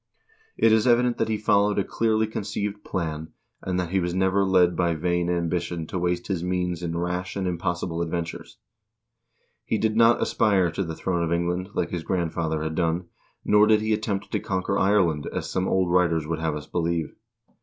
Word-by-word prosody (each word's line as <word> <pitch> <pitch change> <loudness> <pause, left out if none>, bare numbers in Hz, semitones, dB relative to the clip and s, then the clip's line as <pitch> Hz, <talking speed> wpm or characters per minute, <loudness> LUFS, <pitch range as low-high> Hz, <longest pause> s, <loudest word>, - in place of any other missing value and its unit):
It 115 - +4
is 110 +2 +3
evident 120 0 +3
that - - 0
he 110 - 0
followed 105 -1 +2
a 100 - +2
clearly 110 +1 +1
conceived 105 -1 -4
plan, 80 -3 -4 0.3
and 90 -1 -2
that 90 -2 -3
he 95 - +2
was 90 0 -2
never 95 +1 +2
led 90 -2 +3
by 85 -1 +1
vain 85 +2 0
ambition 85 -1 -1
to 90 - -4
waste 90 0 -1
his 95 -4 -2
means 90 -1 -1
in 85 -1 -3
rash 90 +1 -3
and 100 -1 -2
impossible 85 -1 -2
adventures. 85 0 -4 1.1
He 110 - -1
did 110 0 0
not 115 +1 +5
aspire 95 -5 +2
to 95 - -2
the 80 -2 -5
throne 90 -1 -1
of 85 - -2
England, 90 +2 -1
like - - -1
his 85 - -2
grandfather 80 -3 -1
had 80 0 -3
done, 85 +1 -1 0.4
nor 105 0 +5
did 110 -1 +5
he 110 0 +1
attempt 105 -2 -2
to - - 0
conquer 95 0 -2
Ireland, 95 -7 +2
as - - -4
some 95 0 0
old 95 -2 +1
writers 85 -3 +2
would 80 +1 -3
have 80 -2 -1
us 75 0 -6
believe. 85 -2 -2
90 Hz, 195 wpm, -25 LUFS, 85-100 Hz, 1.1 s, not